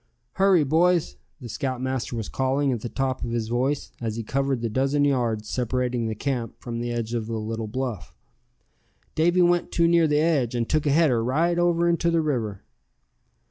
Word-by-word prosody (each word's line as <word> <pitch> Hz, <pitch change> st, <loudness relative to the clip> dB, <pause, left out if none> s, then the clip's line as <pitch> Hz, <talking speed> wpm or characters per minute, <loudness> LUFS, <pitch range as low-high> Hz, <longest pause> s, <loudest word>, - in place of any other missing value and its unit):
"Hurry, 190 Hz, -4 st, +4 dB
boys!" 165 Hz, +4 st, +2 dB, 0.2 s
the 125 Hz, -, -8 dB
scoutmaster 130 Hz, -1 st, -3 dB
was 110 Hz, -3 st, -4 dB
calling 135 Hz, +1 st, 0 dB
at 120 Hz, -4 st, -2 dB
the 120 Hz, -, -5 dB
top 130 Hz, 0 st, -2 dB
of -, -, -3 dB
his 115 Hz, -1 st, -2 dB
voice, 130 Hz, +4 st, -1 dB
as 110 Hz, -2 st, -2 dB
he 115 Hz, -, -4 dB
covered 135 Hz, +1 st, -1 dB
the 115 Hz, -, -1 dB
dozen 135 Hz, +5 st, +1 dB
yards 120 Hz, -6 st, 0 dB
separating 125 Hz, -1 st, -1 dB
the 110 Hz, -, -3 dB
camp 120 Hz, 0 st, -3 dB
from 120 Hz, -2 st, -5 dB
the 120 Hz, 0 st, -3 dB
edge 115 Hz, -1 st, -3 dB
of 115 Hz, -2 st, -2 dB
the 115 Hz, -1 st, -3 dB
little 110 Hz, +1 st, -4 dB
bluff; 120 Hz, -3 st, -4 dB, 1.0 s
"Davy 175 Hz, +3 st, +3 dB
went 175 Hz, 0 st, +2 dB
too 170 Hz, -1 st, +3 dB
near 170 Hz, -1 st, +4 dB
the 150 Hz, -1 st, +2 dB
edge, 150 Hz, -7 st, +1 dB
and 115 Hz, -1 st, -1 dB
took 155 Hz, -1 st, 0 dB
a -, -, +3 dB
header 140 Hz, -7 st, +3 dB
right 165 Hz, +8 st, +1 dB
over 170 Hz, 0 st, +2 dB
into 170 Hz, 0 st, +2 dB
the 165 Hz, -1 st, +2 dB
river!" 115 Hz, -10 st, -2 dB
130 Hz, 190 wpm, -25 LUFS, 115-155 Hz, 1.0 s, Hurry